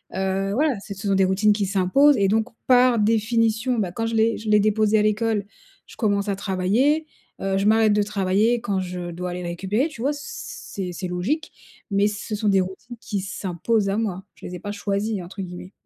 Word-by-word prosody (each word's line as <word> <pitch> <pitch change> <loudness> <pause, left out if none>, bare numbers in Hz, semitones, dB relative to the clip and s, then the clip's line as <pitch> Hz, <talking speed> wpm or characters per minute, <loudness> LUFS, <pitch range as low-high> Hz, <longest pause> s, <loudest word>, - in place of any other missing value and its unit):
Heu, 190 +1 -1
voilà, 290 +2 +2
ce 200 - -5
sont 195 0 -2
des 190 - +4
routines 195 +3 +3
qui 205 -1 -1
s'imposent 200 +10 +4
et 195 -1 +2
donc 220 +2 +2 0.2
par 250 -2 +5
définition, 225 +2 +1
bah 190 -4 -1
quand 225 +5 -3
je 225 0 -2
l'ai 225 +1 +2
je 215 0 -6
l'ai 210 0 +5
déposé 215 0 +3
à - - +3
l'école, 215 0 +1 0.4
je - - -15
commence 205 -2 0
à 200 - 0
travailler. 215 +11 +1 0.4
Heu, 195 0 0
je 195 - 0
m'arrête 220 -1 +4
de 210 0 +3
travailler 210 +3 +1
quand 200 -4 -1
je 180 -1 -4
dois 180 +1 -4
aller 180 - -5
le 175 - -4
récupérer, 195 - 0
tu 285 -7 -13
vois? 280 +4 +1
C 290 - -8 0.5
c'est 185 -3 -3
c'est 185 +2 -4
logique 250 - -2 0.4
mais 200 +1 +3
ce 210 +1 -5
sont 210 +1 -1
des 195 -2 +4
routines 190 +6 -7
qui 205 -5 -3
s'imposent 195 +2 -1
à 195 - 0
moi. 195 -4 -2
Je - - -13
les 180 - -6
ai - - -7
pas 205 - -5
«choisies» 205 0 -2
entre 185 +3 -8
guillemets. 180 +1 -8
205 Hz, 220 wpm, -23 LUFS, 190-225 Hz, 0.5 s, par